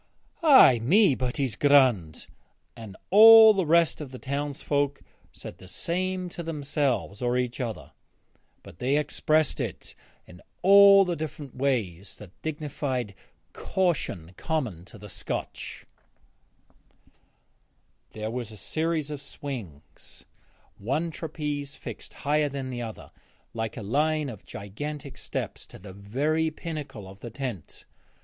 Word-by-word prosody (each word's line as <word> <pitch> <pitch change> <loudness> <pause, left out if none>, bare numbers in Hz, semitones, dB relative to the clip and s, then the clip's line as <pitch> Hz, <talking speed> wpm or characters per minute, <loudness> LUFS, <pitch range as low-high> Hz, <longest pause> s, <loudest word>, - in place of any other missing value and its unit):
'Ay 265 - +7
me, 175 - +4
but 125 +1 -3
he's 130 -7 -1
grond'; 125 - +3 0.5
and 110 -5 -10
all 220 +2 +10
the 190 -5 -1
rest 165 0 +3
of 145 - -7
the 130 - -9
townsfolk 145 +1 -2 0.3
said - - -10
the 95 - -13
same 185 - -2
to 175 0 -7
themselves 145 -8 -2
or 125 0 +1
each 125 +1 -2
other, 115 -3 -5 0.7
but - - -14
they 135 +4 +1
expressed 155 0 +1
it - - -5 0.3
in 90 -1 -15 0.2
all 200 +1 +8
the 175 -1 -2
different 150 -3 -7
ways 110 -9 -2
of - - -16
that - - -41
dignified 145 -7 -3 0.4
caution 135 - -2
common 125 - -3
to 110 - -14
the 105 +1 -11
Scotch. 95 - -6 2.3
There 110 0 -4
was 120 -2 -5
a 110 - -11
series 155 - -2
of 145 -2 -6
swings, 125 - -9 0.5
one 145 +11 -1
trapeze 150 -3 -5
fixed - - -9
higher 150 +1 0
than 135 -2 -5
another, 120 -3 -7 0.4
like 110 0 -4
a 110 - -6
line 150 +6 0
of 110 -6 -11
gigantic 140 +8 -7
steps, - - -5
to - - -13
the 95 +1 -11
very 145 +11 -1
pinnacle 150 - -7
of 95 +1 -13
the 120 - -8
tent. 120 - -7
140 Hz, 130 wpm, -26 LUFS, 115-155 Hz, 2.3 s, all